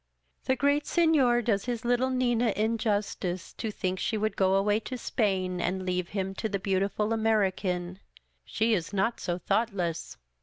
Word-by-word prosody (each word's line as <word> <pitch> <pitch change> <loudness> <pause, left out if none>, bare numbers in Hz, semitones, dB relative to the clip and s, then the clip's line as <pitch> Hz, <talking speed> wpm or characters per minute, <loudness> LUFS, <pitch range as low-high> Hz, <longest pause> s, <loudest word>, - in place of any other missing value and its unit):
" 65 - -42
The 260 - +2
great 285 +2 +1
Senor 280 -8 +3
does 205 -3 0
his 240 -2 -3
little 245 +2 +2
Nina 245 -3 +1
injustice 210 -4 -1
to 220 - -4
think 185 -3 -2
she 220 - -1
would 215 +1 -1
go 190 0 +3
away 205 +2 +2
to 255 +3 -6
Spain 185 -6 -1
and 185 +2 -1
leave 180 -1 -1
him 195 -1 -2
to 220 - -1
the 200 - -1
beautiful 195 +3 0
American. 190 -5 0 0.4
She 225 +1 0
is 180 -2 -1
not 200 +4 0
so 175 -1 -2
thoughtless. 180 -4 -1
210 Hz, 165 wpm, -28 LUFS, 185-235 Hz, 0.4 s, Senor